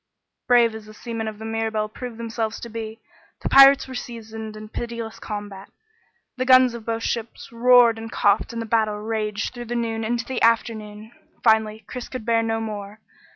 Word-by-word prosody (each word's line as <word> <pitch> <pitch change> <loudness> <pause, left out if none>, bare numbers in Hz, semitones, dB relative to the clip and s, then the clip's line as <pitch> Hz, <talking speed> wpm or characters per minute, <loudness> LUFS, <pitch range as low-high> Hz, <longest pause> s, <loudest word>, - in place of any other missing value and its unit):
Brave 240 -2 +5
as 220 -1 -9
the 215 - -13
seamen 230 -1 -5
of 215 -1 -5
the 220 - -8
Mirabelle 220 -1 -1
proved 235 +2 -8
themselves 225 -1 -3
to 235 - -7
be, 225 0 -6 0.4
the - - -1
pirates 275 0 +8
were 260 - -8
seasoned 220 -3 -7
in 215 0 -9
pitiless 230 0 -6
combat. 205 -2 -7 0.7
The 255 - -1
guns 255 -1 +6
of 235 -1 -9
both 225 0 -2
ships 230 0 -4
roared 235 -1 +5
and 225 0 -7
coughed 205 +3 +2
and 235 - -5
the - - -7
battle 220 -2 +1
raged 215 0 -3
through 240 -1 -7
the 240 +1 -4
noon 225 -1 -2
into 235 +1 -1
the 260 -2 -4
afternoon. 220 -1 0 0.3
Finally, 220 -1 +3
Chris 250 +3 -7
could 255 -4 -6
bear 230 -1 +3
no 225 0 -1
more. 210 -1 -6
225 Hz, 190 wpm, -23 LUFS, 215-235 Hz, 0.7 s, pirates